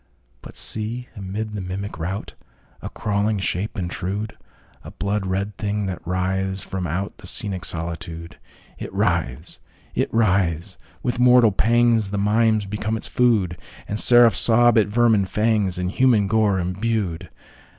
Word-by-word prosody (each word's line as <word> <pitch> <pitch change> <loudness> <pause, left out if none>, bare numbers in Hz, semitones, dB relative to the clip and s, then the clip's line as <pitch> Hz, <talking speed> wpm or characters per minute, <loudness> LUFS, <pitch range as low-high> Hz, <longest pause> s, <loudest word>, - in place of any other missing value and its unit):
But - - -12
see, 115 +3 -3
amid 105 +2 -5
the 105 - -4
mimic 95 0 -5
routA 95 +5 -4 0.6
crawling 105 +1 0
shape 95 +3 -2
intrude!A 95 +3 -6
blood 100 -1 -2
red 100 +2 -2
thing 105 0 -1
that 95 -3 -4
writhes 95 +1 -1
from 95 -1 -4
outThe 95 +5 -4
scenic 95 -2 -1
solitude! 85 -1 -6 0.4
It - - -6
writhes!—it 65 -1 -3
writhes!—with 100 +2 -1
mortal 125 -3 +6
pangsThe 115 -1 +2
mimes 110 +1 +2
become 105 +2 -3
its - - -4
food, 105 -9 +1 0.3
And 105 - -3
seraphs 120 -5 +6
sob 120 0 +5
at 105 - +2
vermin 110 -2 +3
fangsIn 95 -4 0
human 120 -3 +3
gore 105 -1 +2
imbued. 90 -1 -2
100 Hz, 120 wpm, -22 LUFS, 95-110 Hz, 0.6 s, mortal